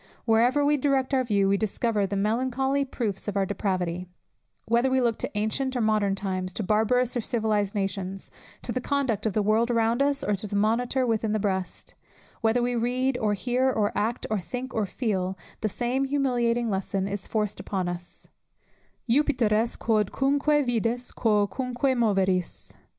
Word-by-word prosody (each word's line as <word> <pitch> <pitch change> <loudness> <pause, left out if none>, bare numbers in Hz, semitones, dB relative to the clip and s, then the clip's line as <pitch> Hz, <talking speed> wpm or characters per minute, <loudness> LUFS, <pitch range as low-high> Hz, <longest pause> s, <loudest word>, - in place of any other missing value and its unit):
Wherever 245 +6 +3
we 295 +1 +3
direct 275 -1 +1
our 260 -1 +3
view, 200 -5 +2
we 200 +1 +3
discover 215 0 0
the 200 - -3
melancholy 260 +6 +1
proofs 220 -7 -3
of 205 -1 -2
our 195 - +2
depravity; 185 -3 -2 0.6
whether 235 +3 +2
we 260 0 +2
look 235 -3 +1
to - - -1
ancient 260 +5 -1
or 245 - 0
modern 215 -3 +2
times, 185 -2 -3
to 215 - -3
barbarous 225 +5 +2
or 240 - 0
civilized 215 -3 0
nations, 195 -1 -3 0.3
to - - -3
the 255 - -2
conduct 250 -7 0
of 210 - -1
the 210 - +1
world 220 +3 +2
around 230 +1 +2
us, 280 0 +1
or 210 - +1
to 210 - -6
the 205 - -4
monitor 240 +5 +1
within 220 -2 0
the 215 - +1
breast; 190 -2 -3 0.5
whether 225 +2 +2
we 245 0 0
read, 250 +3 0
or 210 -1 +1
hear, 250 +6 +1
or 215 -5 0
act, 220 +4 -1
or 215 - +1
think, 250 +9 -6
or 215 -3 0
feel, 190 -5 -2 0.2
the 215 - -1
same 250 +5 -1
humiliating 240 -4 +1
lesson 195 0 -1
is 200 -1 -4
forced 210 -2 -1
upon 190 -3 -2
us, 175 0 -6 0.8
Juppiter 255 -3 +2
est 225 +2 +1
quodcunque 275 +7 +2
vides, 240 +1 -1
quocunque 245 +5 +1
moveris. 195 -6 0
225 Hz, 170 wpm, -26 LUFS, 200-250 Hz, 0.8 s, Wherever